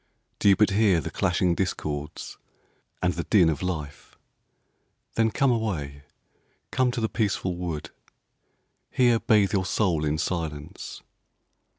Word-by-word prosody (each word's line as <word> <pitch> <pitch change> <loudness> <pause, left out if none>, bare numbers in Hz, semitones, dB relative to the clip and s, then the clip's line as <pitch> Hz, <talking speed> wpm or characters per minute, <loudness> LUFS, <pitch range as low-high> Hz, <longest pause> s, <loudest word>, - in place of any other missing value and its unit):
Do 100 - +4
you 100 - +7
but 105 0 +3
hear 100 -4 +4
the 75 - -5
clashing 90 0 +1
discords 75 -5 -4 0.6
and 90 0 +2
the 85 - -3
din 90 -6 +5
of 75 - -2
life? 75 -6 -5 1.0
Then 115 0 +2
come 135 +3 +2
away, 85 -12 -2 0.7
come 130 -1 +2
to 120 - -3
the 110 - +1
peaceful 100 -5 -1
wood, 85 -4 -5 1.0
Here 120 -3 +3
bathe 105 -3 +3
your 95 -2 +2
soul 90 -5 +1
in 75 0 0
silence. 80 -4 -4
90 Hz, 130 wpm, -26 LUFS, 80-110 Hz, 1.0 s, you